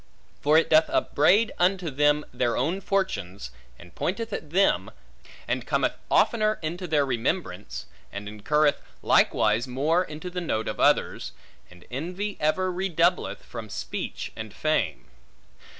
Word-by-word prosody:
For 150 +2 +4
it 165 - +2
doth 155 0 +5
upbraid 200 +10 +3
unto 180 -2 +2
them 145 +2 +2
their 120 -1 0
own 165 +10 0
fortunes, 100 - -2 0.3
and 85 0 -15
pointeth 225 +5 -3
at 150 - -5
them, 190 +5 +2 0.6
and - - -2
cometh - - +1 0.2
oftener 215 -2 +3
into 175 +4 -4
their 150 -3 +2
remembrance, 115 - -3 0.3
and 100 +1 -6
incurreth 145 +9 +1 0.2
likewise 110 +4 +3
more 150 +8 +1
into 160 +2 -7
the 180 0 -3
note 110 -10 -2
of - - -4
others; - - +2 0.4
and 90 0 -17
envy 180 +10 -3
ever 185 +5 +1
redoubleth 180 -1 0
from 115 -2 -8
speech - - -5
and 110 -2 -8
fame. 115 - 0
155 Hz, 135 wpm, -26 LUFS, 115-180 Hz, 0.6 s, doth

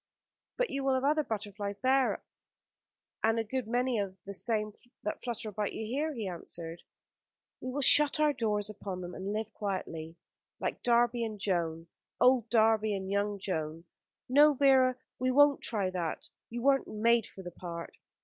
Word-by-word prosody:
"But - - 0
you 275 0 -2
will 270 -1 +2
have 260 - -1
other 300 +2 +3
butterflies 205 -5 -4
there, 260 0 +2 1.0
and 225 +1 +3
a 225 - +1
good 250 +1 -3
many 245 0 0
of 195 -2 -4
the 200 - -6
same 215 0 -1 0.3
that 210 - -3
flutter 235 -3 -4
about 210 0 -3
you 220 - -4
here," 285 +8 -1
he 220 -4 -4
answered. 170 -1 -5 0.8
"We 255 - -5
will 280 +3 -2
shut 295 +2 +7
our 300 -1 +3
doors 210 -5 -1
upon 195 -3 -6
them 175 0 -7
and 195 +2 -5
live 215 +1 -3
quietly." 165 -5 -4 0.4
"Like - - -3
Darby 240 0 +2
and 215 -2 -5
Joan 165 -4 -1 0.3
old 250 -2 +4
Darby 220 -2 +3
and 190 0 -5
young 200 0 0
Joan. 165 -4 -3 0.4
No, 290 +3 +6
Vera, 260 -2 +4 0.2
we 255 +1 +1
won't 285 +2 +5
try 200 -5 0
that. 170 -3 -4 0.2
You 240 +1 -5
weren't 275 0 +3
made 230 +1 +2
for 190 - -12
the 175 - -7
part." 170 -1 -8
220 Hz, 170 wpm, -30 LUFS, 195-255 Hz, 1.0 s, shut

